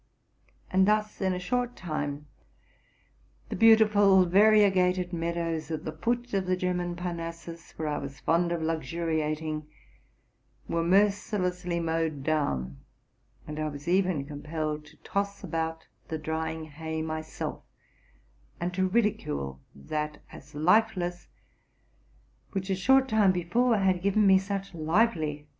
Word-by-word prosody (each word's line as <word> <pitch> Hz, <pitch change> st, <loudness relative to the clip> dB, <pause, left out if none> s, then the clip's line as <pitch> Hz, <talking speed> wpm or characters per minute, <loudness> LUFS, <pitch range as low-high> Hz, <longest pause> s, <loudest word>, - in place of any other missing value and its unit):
And 190 Hz, +1 st, +4 dB
thus, 210 Hz, 0 st, +1 dB
in 190 Hz, -1 st, +2 dB
a 180 Hz, -, -1 dB
short 245 Hz, +7 st, -1 dB
time, 150 Hz, -4 st, -4 dB, 1.2 s
the -, -, -3 dB
beautiful 205 Hz, -3 st, +6 dB
variegated 185 Hz, -2 st, +4 dB
meadows 165 Hz, -1 st, -2 dB
ut 160 Hz, -2 st, -4 dB
the 155 Hz, -, -3 dB
foot 240 Hz, +9 st, -2 dB
of 190 Hz, -2 st, 0 dB
the 185 Hz, 0 st, +1 dB
German 180 Hz, -1 st, -1 dB
Parnassus, 170 Hz, -1 st, -6 dB
where 155 Hz, -, -2 dB
I 150 Hz, -, -1 dB
was 140 Hz, 0 st, -8 dB
fond 170 Hz, +1 st, +1 dB
of 170 Hz, -2 st, -1 dB
luxuriating, 155 Hz, -1 st, -2 dB, 1.0 s
were 170 Hz, -, 0 dB
mercilessly 180 Hz, -2 st, +1 dB
mowed 160 Hz, -3 st, -1 dB
down; 70 Hz, -, -1 dB, 0.7 s
and 150 Hz, 0 st, -6 dB
I 155 Hz, -, -1 dB
was 145 Hz, +1 st, -9 dB
even 180 Hz, -5 st, +1 dB
compelled 150 Hz, +1 st, -4 dB
to 150 Hz, -, -18 dB
toss 200 Hz, 0 st, -2 dB
about 160 Hz, 0 st, -3 dB, 0.2 s
the 160 Hz, -, -3 dB
drying 160 Hz, +1 st, -3 dB
hay 160 Hz, +1 st, -5 dB
myself, 155 Hz, 0 st, -5 dB, 1.0 s
and 175 Hz, +1 st, -2 dB
to 185 Hz, 0 st, +1 dB
ridi 210 Hz, +1 st, +3 dB
cule 70 Hz, -2 st, -5 dB, 0.2 s
that 150 Hz, -, -4 dB
as 145 Hz, +2 st, -13 dB
lifeless 180 Hz, +1 st, +2 dB, 1.3 s
which, 195 Hz, -1 st, -2 dB
a -, -, +2 dB
short 265 Hz, +7 st, +4 dB
time 215 Hz, -5 st, +4 dB
before, 215 Hz, +7 st, +1 dB
had 190 Hz, -2 st, +2 dB
given 200 Hz, +2 st, +3 dB
me 190 Hz, -1 st, +6 dB
such 195 Hz, 0 st, -4 dB
lively 160 Hz, -2 st, +1 dB
joy. -, -, -25 dB
170 Hz, 135 wpm, -28 LUFS, 155-195 Hz, 1.3 s, beautiful